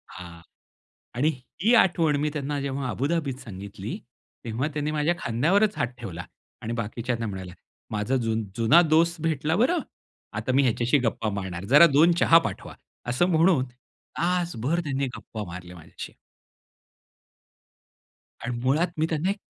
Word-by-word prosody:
हां. 85 -2 -10 0.7
आणि 145 +6 +2 0.3
ही 225 +6 +4
आठवण 165 -8 +4
मी 150 - +1
त्यांना 145 -1 -2
जेव्हा 135 -1 -3
अबुधाबीत 140 0 -1
सांगितली, 100 0 -7 0.5
तेव्हा 120 +6 -1
त्यांनी 150 0 -2
माझ्या 155 +2 +1
खांद्यावरच 185 - +2
हात 120 - +1
ठेवला. 90 -6 -7 0.4
आणि 115 - -4
बाकीच्यांना 115 +1 -3
म्हणाला, 95 -3 -6 0.4
"माझा 105 +4 -1
जुन 110 0 0
जुना 120 +9 +6
दोस्त 170 +1 +3
भेटला 155 0 0
बरं! 260 - +2 0.6
आता 130 - -1
मी 140 - +4
ह्याच्याशी 120 +2 +2
गप्पा 115 -2 -1
मारणार, 95 -1 -5
जरा 145 +9 +8
2 165 +4 +6
चहा 165 - +7
पाठवा." - - -8 0.3
असं 125 +8 +2
म्हणून 165 -5 +3 0.5
तासभर 170 -4 0
त्यांनी 135 -2 -1
गप्पा 110 -2 -7
मारल्या 90 +1 -9
माझ्याशी. 85 -1 -10 2.3
आणि 120 0 -2
मुळात 145 +7 +2
मी 155 - +2
त्यांना 160 +3 0
एक 200 - -1
135 Hz, 140 wpm, -25 LUFS, 110-165 Hz, 2.3 s, जरा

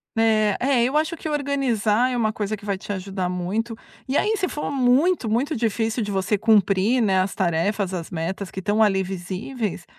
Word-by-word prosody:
Né. 215 -2 +3
É, 260 -2 +3
eu 265 +4 -1
acho 315 +2 +1
que - - -6
organizar 255 -6 +1
é 250 - -2
uma 220 -3 +1
coisa 210 0 -3
que 205 - -16
vai 200 -2 -2
te 200 - -7
ajudar 190 -1 -3
muito. 190 +6 -2 0.3
E 265 - -2
aí, 430 +8 +2
se 370 -2 0
for 295 - -4
muito, 265 +1 +2
muito 265 +8 0
difícil 225 +1 0
de 205 - -3
você 195 +1 0
cumprir, 210 +2 +3
né, 195 -4 +3
as 190 +1 -1
tarefas; 190 +2 0
as 170 -3 -4
metas 185 +3 -4
que 190 - -6
estão 210 +3 +1
ali 195 -3 +3
visíveis, 190 +2 -4
215 Hz, 200 wpm, -23 LUFS, 190-250 Hz, 0.3 s, Né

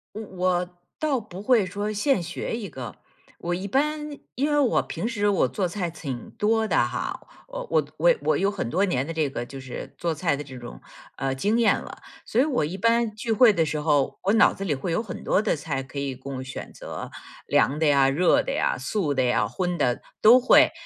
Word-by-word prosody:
我 220 - -5
我 180 0 0 0.2
倒 290 -5 0
不 195 -3 -9
会 230 -3 +4
说 205 +3 -3
现 210 0 +1
学 175 +6 -4
一 210 -4 -5
个。 130 - -8 0.4
我 175 +1 -2
一 190 +3 -4
般 300 +4 -1 0.2
因 285 +4 0
为 295 - +3
我 270 -5 +3
平 - - -4
时 205 -3 0
我 200 - +3
做 190 -3 -2
菜 175 0 -3
挺 145 -7 -6
多 220 +1 +1
的 - - 0
哈， - - -1 0.3
呃 - - -6
我 - - +4 0.2
我 - - +4
我 - - +5
我 - - +2
有 195 - +2
很 200 - -3
多 185 +10 +1
年 135 -8 0
的 165 - -4
这 155 -3 0
个 120 -2 -4
就 135 +1 -9
是 130 -1 -8
做 170 -1 -1
菜 160 0 0
的 145 - -4
这 130 -3 -10
种， 120 0 -10 0.4
呃， 135 0 -1
经 205 +12 0
验 230 - +4
了， - - -11 0.2
所 230 - +1
以 - - +5
我 270 - 0
一 165 +6 -4
般 230 +1 +2
聚 220 +2 -5
会 225 +1 +6
的 170 -5 +2
时 150 -1 -2
候， 150 -3 +1
我 195 - +3
脑 225 - +5
子 195 - -6
里 165 -7 0
会 140 +6 -4
有 165 - +1
很 210 -5 -7
多 195 - +2
的 - - +1
菜 140 -3 -3
可 140 +1 -6
以 135 -2 -3
供 130 0 -6
选 130 0 -8
择。 - - -8 0.3
凉 145 - +2
的 160 - +2
呀， 140 -2 +4
热 170 +6 +3
的 - - -3
呀、 - - 0
素 175 -10 -1
的 130 - +2
呀， 125 -4 +2
荤 175 - -2
的 125 -1 +1 0.2
都 240 +4 +8
会。 255 - +6
180 Hz, 245 characters per minute, -25 LUFS, 140-220 Hz, 0.4 s, 都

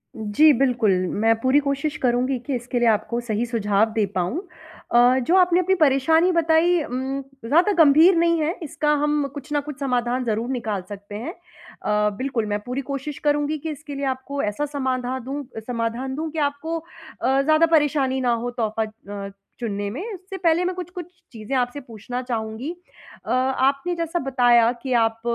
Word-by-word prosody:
जी, 220 +8 +4
बिल्कुल, 245 -6 +2 0.2
मैं 225 +4 +2
पूरी 260 +4 +3
कोशिश 280 +2 -2
करूँगी 250 +2 +1
कि 275 -3 -1
इसके 245 +1 -3
लिए 240 - +3
आपको 235 +2 0
सही 230 0 -2
सुझाव 220 -2 +1
दे 215 -3 +2
पाऊँ। 185 - -1 0.5
अ, 245 +2 +5
जो 330 +9 +1
आपने 360 -1 +4
अपनी 380 +1 +2
परेशानी 320 +3 +3
बताई 335 +1 +3
उम, 265 +2 -3 0.2
ज़्यादा 340 - +4
गंभीर 315 +6 +6
नहीं 335 -1 +3
है, 320 +4 0
इसका 300 0 -1
हम 295 -1 +1
कुछ 290 +1 -9
ना 290 - +2
कुछ 295 -2 -7
समाधान 250 -1 0
ज़रूर 225 +2 -1
निकाल 220 -7 -2
सकते 205 0 -9
हैं। 255 - -5
अ, 210 -11 -3
बिल्कुल, 255 -4 -1
मैं 205 0 -2
पूरी 250 +3 -3
कोशिश 275 +1 -5
करूँगी 295 +1 +1
कि 320 +2 -6
इसके 295 -1 -8
लिए 280 0 -3
आपको 280 +2 -5
ऐसा 210 +8 -1
समाधा 260 -3 -2
दूँ 275 +4 -5
अ, - - -1
समाधान 240 +2 -2
दूँ 315 +1 -3
कि 320 - -4
आपको 320 +4 -5
अ, 275 -4 -2
ज़्यादा 310 +3 +4
परेशानी 290 -5 +2
ना 245 -1 +2
हो 245 - -2
तोहफ़ा 220 0 0 0.4
अ, - - -8 0.3
चुनने 205 -3 -3
में। 265 - -5
उससे 385 +1 -8
पहले 340 0 +2
मैं 365 - -1
कुछ-कुछ 360 -1 -6 0.3
चीज़ें 225 +3 -5
आपसे 245 +3 -1
पूछना 245 +1 -6
चाहूँगी। 230 +3 -4 0.5
अ, 225 - -4
आपने 265 +5 +1
जैसा 335 +1 -2
बताया 245 -4 +4
कि 260 -1 -2
आप 225 0 0
265 Hz, 180 wpm, -23 LUFS, 235-310 Hz, 0.5 s, गंभीर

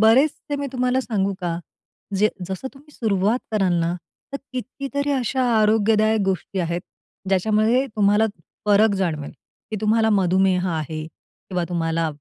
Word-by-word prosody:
बरेचसे 270 +6 +3
मी 285 0 -3
तुम्हाला 255 0 +1
सांगू 200 -6 -1
का? 170 -1 -2 0.6
जे 210 +2 +4 0.2
जसं 190 +8 -4
तुम्ही 295 +2 -17
सुरुवात 210 +1 +1
कराल 195 -4 +2
ना, 170 +1 0 0.4
तर - - -1 0.2
कितीतरी 275 +3 -3
अशा 260 0 0 0.2
आरोग्यदायक 215 0 +3
गोष्टी 190 0 -2
आहेत 170 +1 -1 0.5
ज्याच्यामध्ये 215 +7 +2
तुम्हाला 205 +2 +4 0.4
फरक 205 0 +5
जाणवेल, 160 -6 -2 0.4
की 215 - -2
तुम्हाला 220 +1 +3
मधुमेह 190 -1 +3
आहे 155 -1 -3
किंवा 180 +2 -6
तुम्हाला 165 -1 0
210 Hz, 135 wpm, -22 LUFS, 180-240 Hz, 0.6 s, फरक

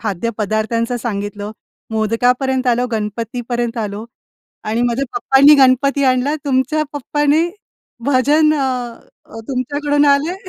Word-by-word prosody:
खाद्यपदार्थांचं 220 +3 -2
सांगितलं, 205 -2 -4 0.4
मोदकापर्यंत 245 +4 0
आलो, 245 0 +2
गणपतीपर्यंत 235 +3 -3
आलो 210 0 -4 0.6
आणि 230 +3 0
माझ्या 245 +3 0
पप्पांनी 290 -6 +6
गणपती 275 +2 +2
आणला. 260 +3 +2
तुमच्या 270 +3 +1
पप्पाने 295 +3 +1 0.6
भजन 290 +3 +3
अ, 255 -4 -2 0.5
तुमच्याकडून 285 +3 0
आले 285 +5 +2
250 Hz, 95 wpm, -17 LUFS, 230-280 Hz, 0.6 s, पप्पांनी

